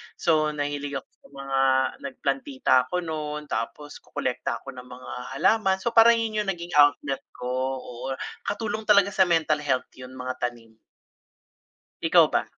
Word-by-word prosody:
So, 155 -2 +1
nahilig 145 -1 -3
ako - - -5
sa - - -19
mga 135 -1 -2 0.4
nagplantita 135 0 -1
ako - - -4
no'n 150 -2 -4
tapos 145 +5 -4
kokolekta - - -3
ako - - -7
ng 125 0 -11
mga 125 0 -10 0.2
halaman. 195 +5 +3
So 235 - 0
parang 230 +1 +7
yun 225 -2 -1
yung - - -11
naging 175 -2 -4
outlet 145 -2 +4 0.2
ko, 125 - -4 0.3
oo 125 +2 -5 0.3
katulong 215 +1 -3
talaga 200 -1 +5
sa 190 -2 +3
mental 160 -3 +2
health 130 -4 -1
yun 125 +1 -10
mga 130 0 -5
tanim. 115 -2 -13 1.3
Ikaw - - +6
ba? - - 0
145 Hz, 155 wpm, -25 LUFS, 130-180 Hz, 1.3 s, parang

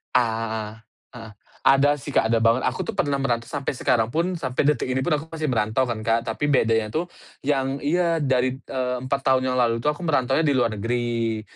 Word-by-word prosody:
Ah, 110 -2 -1 0.3
heeh. 115 -3 -10 0.3
Ada 140 +2 +5
sih, 145 0 -8
Kak, 110 - +2
ada 115 - +3
banget. 115 +2 +3
Aku 130 - -5
tuh 225 - -4
pernah 145 -8 0
merantau 120 -4 -1
sampai 140 -1 -3
sekarang 115 -3 +1
pun, 175 +3 0
sampai 130 -5 -1
detik 150 -5 0
ini 130 0 -1
pun, 150 +3 +1
aku 150 - -7
masih 155 -2 -2
merantau 110 0 +1
kan, 115 - -2
Kak. 115 0 +2
Tapi 115 +6 -3
bedanya 115 -6 +2
tuh, 175 +3 -2 0.3
yang 135 -1 -1
iya 165 +2 +1
dari, 130 -2 +1
eee, 125 -1 -3
4 130 +2 -1
tahun 130 -1 +3
yang 125 - -1
lalu 115 -2 +2
itu 150 - +1
aku 150 +4 -4
merantaunya 145 0 +1
di 145 - +3
luar 115 -4 +1
negeri. 115 0 -1
130 Hz, 210 wpm, -23 LUFS, 115-145 Hz, 0.3 s, Ada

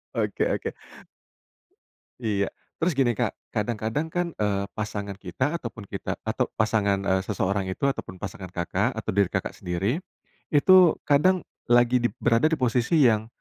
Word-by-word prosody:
Oke - - 0
oke. - - -2 1.5
Iya. 100 -3 +1 0.3
Terus 170 0 +1
gini, 120 -4 +3
Kak, - - 0 0.2
kadang-kadang 115 +7 -1
kan, 175 -1 0
eee, 100 -2 0
pasangan 100 -2 -4
kita 115 - -2
ataupun 115 -7 -8
kita - - -4
atau - - -1
pasangan, 105 -3 +2
eee, 95 0 +2
seseorang 100 -1 -1
itu, 140 - -1
ataupun 95 -9 -4
pasangan, 95 -2 -6
Kakak, 95 +7 0
atau 110 - -6
diri, 100 -3 +3
Kakak, - - -2
sendiri. 100 - -2 0.5
Itu 180 +3 +6
kadang 170 +5 +3 0.3
lagi 120 +1 +5
dip 120 - 0
berada 115 +6 +4
di 160 - +1
posisi 125 +5 +2
yang 110 -3 +4
110 Hz, 150 wpm, -26 LUFS, 100-140 Hz, 1.5 s, Itu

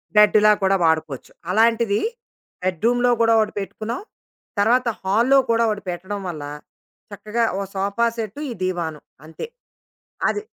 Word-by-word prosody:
బెడ్డులా 210 0 +6
కూడా 190 0 +4
వాడుకోవచ్చు. 160 -4 -1 0.2
అలాంటిది 225 0 +3 0.6
బెడ్‌రూమ్‌లో 235 +7 +2
కూడా 230 0 +5
ఒకటి 215 -1 0
పెట్టుకున్నాం. 215 +4 -5 0.6
తర్వాత 240 +5 +3 0.2
హాల్‌లో 230 +8 +4
కూడా 230 0 +3
ఒకటి 210 -1 -3
పెట్టడం 190 +3 -4
వల్ల, 155 -4 -6 0.7
చక్కగా 210 +3 -2 0.2
ఓ - - -1
సోఫా 200 +4 0
సెట్టు 220 +2 -5
ఈ - - -4
దివాను 170 -4 -2 0.3
అంతే. 160 - -7 0.8
అది. 415 +1 -3
210 Hz, 125 wpm, -22 LUFS, 185-230 Hz, 0.8 s, బెడ్డులా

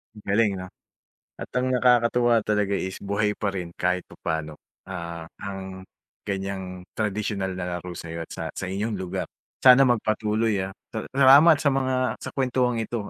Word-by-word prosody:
Ang 105 - -13
galing, 105 +1 +3
'no? 90 0 -6 0.7
At - - -7
ang 125 +1 +1
nakakatuwa 120 -1 +4
talaga 105 -2 +1
is 95 0 -4
buhay 100 +1 0
pa 100 -2 -1
rin 90 -3 -5
kahit 90 0 0
papaano, 80 -1 -4 0.3
ah, 85 -3 -6 0.2
ang 95 -2 -7 0.4
ganiyang 95 -2 -4
tradisyonal 105 -2 -2
na 90 -1 -4
laro 90 +1 -8
sa'yo 85 0 -6
at - - -20
sa - - -5
sa - - -4
inyong 105 +4 -2
lugar. 90 -1 -3 0.4
Sana 130 +1 +9
magpatuloy, 110 -2 +1
ah. 95 - -5 0.2
Sa 110 - -4
salamat 140 +5 +7
sa 145 - +3
mga 130 -1 0 0.3
sa - - -4
kuwentuang 125 -2 0
ito, 115 +1 -3
105 Hz, 160 wpm, -25 LUFS, 95-120 Hz, 0.7 s, Sana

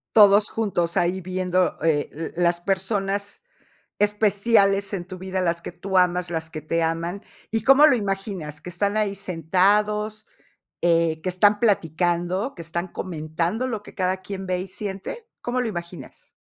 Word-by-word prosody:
Todos 205 -1 +7
juntos 180 -6 -1
ahí 180 +2 +1
viendo, 185 0 0
eh, 155 -3 +2
l 160 +2 -6
las 175 0 +2
personas 195 +1 -1 0.6
especiales 205 -1 +2
en 180 -3 -3
tu 185 +1 -8
vida, 190 0 -3
las 170 -1 -1
que - - -6
tú 190 +2 -2
amas, 180 -1 +2
las 160 -1 -4
que 155 - -6
te 165 +2 0
aman. 165 +4 -2 0.3
Y, 225 -1 -1
¿cómo 270 +5 +7
lo 285 - +5
imaginas?, 195 -8 -4
¿qué 180 - -8
están 200 +4 -1
ahí 210 -2 0
sentados?, 205 +4 +1 0.5
eh, 165 -2 +2
¿qué 185 - -1
están 205 +3 +3
platicando?, 175 - +1
¿que 170 - -8
están 170 +2 -4
comentando 170 +6 -3
lo 225 -5 -3
que - - -14
cada 185 0 0
quien 195 0 -6
ve 185 -1 -1
y 185 - -5
siente? 205 - -6
¿Cómo 250 +1 -1
lo 245 - -1
imaginas? 170 -7 -8
185 Hz, 165 wpm, -24 LUFS, 170-205 Hz, 0.6 s, Todos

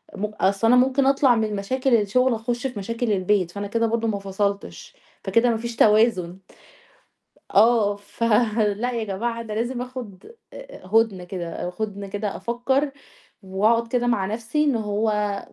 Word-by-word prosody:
م 205 - -2
أصل 210 0 0
أنا 245 - +6
ممكن 265 +2 +3
أطلع 270 -2 +4
من 220 -2 -1
مشاكل 255 +6 +1
الشغل 235 +4 +2
أخش 240 +3 -2
في 245 -5 -7
مشاكل 230 +3 -2
البيت، 185 -2 +1
فأنا 200 +2 -5
كده 230 +2 0
برضه 230 0 -1
ما 205 -2 -1
فصلتش، 195 - -4 0.3
فكده 230 +5 +2
ما 230 - +1
فيش 235 +1 -6
توازن. 210 -6 +3 1.1
آه 215 -1 +4
ف 205 +3 -8 0.5
لأ 245 +3 -1
يا 230 -2 -2
جماعة 230 +4 -3
أنا 220 -2 -7
لازم 240 +3 -2
آخد 250 - -8 0.2
آآ - - -11
هدنة 215 -2 +2
كده 175 -1 -5
هدنة 200 -2 -4
كده 205 +1 -4
أفكّر 245 +7 -1 0.5
وأقعد 215 +5 +1
كده 245 +1 0
مع 225 -5 +1
نفْسي 230 +8 -1
إن 285 -4 +2
هو 210 -1 -1
220 Hz, 160 wpm, -23 LUFS, 200-240 Hz, 1.1 s, أنا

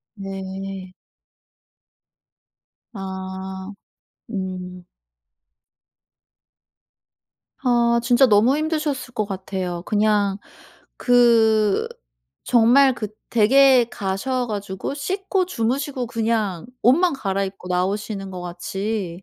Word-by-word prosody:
네. 195 -1 -7 2.0
아, 190 -1 -6 0.6
음. 185 -3 -5 2.8
아, 235 -1 +3
진짜 245 +2 +5
너무 230 +5 +4
힘드셨을 305 -5 -2
것 215 -3 0
같아요. 185 -3 -4
그냥 205 -2 +1 0.6
그 225 -4 +3 0.6
정말 250 +3 +5
그 215 -3 -5 0.2
댁에 255 +2 +5
가셔 245 +7 -2
가지고 200 +1 -4
씻고 380 +5 -1
주무시고 260 -2 -2
그냥 220 -6 -1 0.2
옷만 325 +7 +4
갈아입고 195 -5 -3
나오시는 195 +2 -2
것 185 -1 -7
같이 180 +1 -4
210 Hz, 155 characters per minute, -22 LUFS, 190-245 Hz, 2.8 s, 진짜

